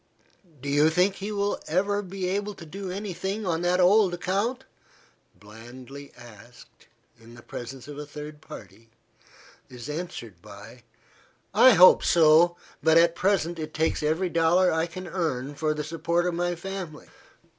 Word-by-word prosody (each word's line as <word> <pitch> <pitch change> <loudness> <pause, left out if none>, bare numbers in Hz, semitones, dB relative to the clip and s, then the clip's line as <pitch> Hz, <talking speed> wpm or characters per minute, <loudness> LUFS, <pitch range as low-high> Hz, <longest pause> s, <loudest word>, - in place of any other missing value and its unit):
"Do - - -6
you 145 +2 +3
think 185 +4 +1
you 210 +2 -4
will 200 0 -1
ever 200 +5 0
be 190 -1 -5
able 200 +2 -2
to 165 - -11
do 190 +4 -7
any 195 +1 -5
thing 195 +4 -4
on 165 -2 -1
that 175 +1 +1
old 185 0 +4
account?" 205 +9 -2 0.8
blandly 125 +6 -12
asked, 120 0 -16 0.3
in 115 +1 -15
the 120 - -15
presence 125 +2 -9
of 145 0 -8
a 150 - -6
third 150 +1 -9
party, 115 -3 -13 0.8
is 125 0 -10
answered 135 - -7
by, - - -13 0.7
"I 260 -1 +7
hope 185 -1 +7
so. 170 +1 +4 0.2
But, 160 0 +4
at 170 0 +5
present, 175 -3 0
it 155 0 -6
takes 160 +1 0
every 160 +5 0
dollar 170 +2 +3
I 160 +1 0
can 185 +2 -8
earn 145 -7 -3
for 155 +1 -1
the 150 0 -3
support 165 +2 -1
of 180 - -1
my 175 +1 -1
family." 180 -3 -7
170 Hz, 160 wpm, -26 LUFS, 150-185 Hz, 0.8 s, I